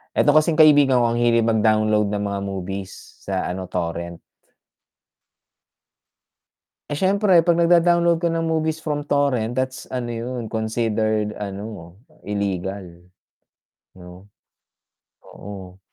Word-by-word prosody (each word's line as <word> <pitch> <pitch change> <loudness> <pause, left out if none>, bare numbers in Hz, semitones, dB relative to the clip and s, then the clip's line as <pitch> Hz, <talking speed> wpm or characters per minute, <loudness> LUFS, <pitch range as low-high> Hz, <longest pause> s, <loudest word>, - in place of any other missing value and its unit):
Eto - - +3
kasing 155 +1 +4
kaibigan 145 -5 +5
ko 120 - +2
ang 120 - -1
hilig 120 -1 +3
mag-download 110 -2 +2
ng 105 - -2
mga 100 -1 -2
movies, 95 0 -7
sa 95 -2 -2
ano, 95 +1 -4
Torrent. 85 -1 -4 2.7
Eh, 145 - -3
siyempre 195 -1 +3
'pag 170 0 +3
nagda-download 170 0 +3
ka 170 - 0
ng 165 0 -1
movies 160 -1 -1
from 145 -1 -3
Torrent, 125 -6 0
that's 130 0 -3
ano 125 -2 -4
yun 120 0 -5
considered 110 -1 -1
ano, 100 -3 -7 0.3
llegal. 95 -3 -4 0.9
'No. 90 +1 -14 1.0
Oo. 95 -2 -11
110 Hz, 115 wpm, -21 LUFS, 100-145 Hz, 2.7 s, kaibigan